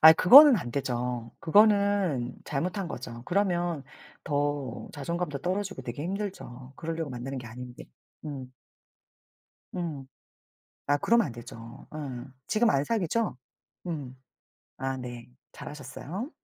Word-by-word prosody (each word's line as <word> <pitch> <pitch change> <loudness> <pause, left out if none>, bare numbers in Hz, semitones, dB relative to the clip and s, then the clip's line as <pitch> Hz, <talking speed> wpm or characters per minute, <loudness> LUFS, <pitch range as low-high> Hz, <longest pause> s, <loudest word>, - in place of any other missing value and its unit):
아이, 160 +1 +11
그거는 275 - +10
안 120 - -4
되죠. 120 -2 -2
그거는 200 - +3
잘못한 180 +6 -2
거죠. 120 -5 -7
그러면 175 -4 0 0.4
더 145 -5 -2
자존감도 155 0 -3
떨어지고 185 0 -2
되게 125 +3 -5
힘들죠. 180 -10 -5
그러려고 165 -2 -3
만나는 130 +2 -5
게 125 - -8
아닌데. 125 +2 -9 0.4
음. 135 -4 -6 1.2
음. 155 -7 -4 0.8
아, 145 +1 +4
그러면 230 +9 +3
안 130 - -6
되죠. 115 -1 -10
예. - - -6 0.5
지금 225 +1 +3
안 140 -8 +3
사귀죠? 215 - 0 0.5
음. 145 -7 -4 0.6
아, 135 0 -2
네. 120 -2 -7 0.3
잘하셨어요. 150 - -7
145 Hz, 250 characters per minute, -28 LUFS, 125-185 Hz, 1.2 s, 아이